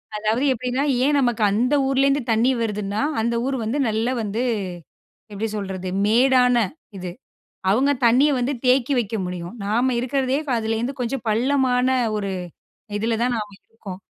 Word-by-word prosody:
அதாவது, 215 +4 0
எப்படின்னா, 250 +2 -2 0.2
ஏன் 290 +1 +3
நமக்கு 240 -4 0
அந்த 245 +8 +2
ஊர்லேருந்து 275 +1 +2
தண்ணீ 230 +4 +3
வருதுன்னா, 210 -1 -2 0.2
அந்த 235 +1 0
ஊர் 270 0 -1
வந்து 225 +6 -2
நல்லா 220 +3 0
வந்து 215 +2 -2 0.9
எப்படி 210 +2 -3
சொல்றது? 190 -2 -4 0.2
மேடான 250 +2 +4 0.4
இது, 180 -1 -5 0.6
அவுங்க 260 +8 +3
தண்ணீய 260 +6 +5
வந்து 250 +4 0
தேக்கி 255 +2 +3
வைக்க 225 -1 -3
முடியும். 180 0 -6
நாம 240 +6 +1
இருக்கிறதே 260 +1 0 0.2
அதுலேருந்து 225 +3 -2
கொஞ்சம் 250 +1 -2
பள்ளமான 250 +2 +2 0.3
ஒரு 200 -1 -3 0.7
இதில 225 +2 0
தான் 245 0 +1
நாம 210 -2 -4 0.2
இருக்கோம். 200 -5 -9
235 Hz, 140 wpm, -22 LUFS, 215-260 Hz, 0.9 s, தண்ணீய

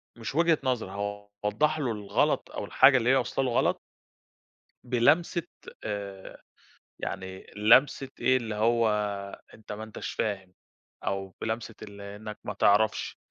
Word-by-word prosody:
مش 115 +3 -6
وجهة 165 0 +4
نظري 125 -7 -1
هاوضح 105 +9 -2
له 130 -5 0
الغلط 105 -2 0
أو - - -4
الحاجة 135 -1 +6
اللي 120 0 +1
هي 135 - +6
واصله 130 +1 0
له 125 - 0
غلط - - +2 1.0
بلمسة 155 +8 +2 0.4
آآ 100 -2 -6 0.6
يعني 95 -1 -6
لمسة 130 +6 +4
إيه 130 0 +4
اللي 110 -3 -4
هو 115 +1 +3 0.6
أنت 110 -1 -12
ما 105 +1 -5
أنتش 110 -1 -6
فاهم 95 -4 -3 0.5
أو 95 -1 -3
بلمسة 110 0 -3
اللي 100 -1 -9
إنك 105 0 -8
ما - - -4
تعرفش 105 +2 +2
110 Hz, 135 wpm, -28 LUFS, 100-125 Hz, 1.0 s, الحاجة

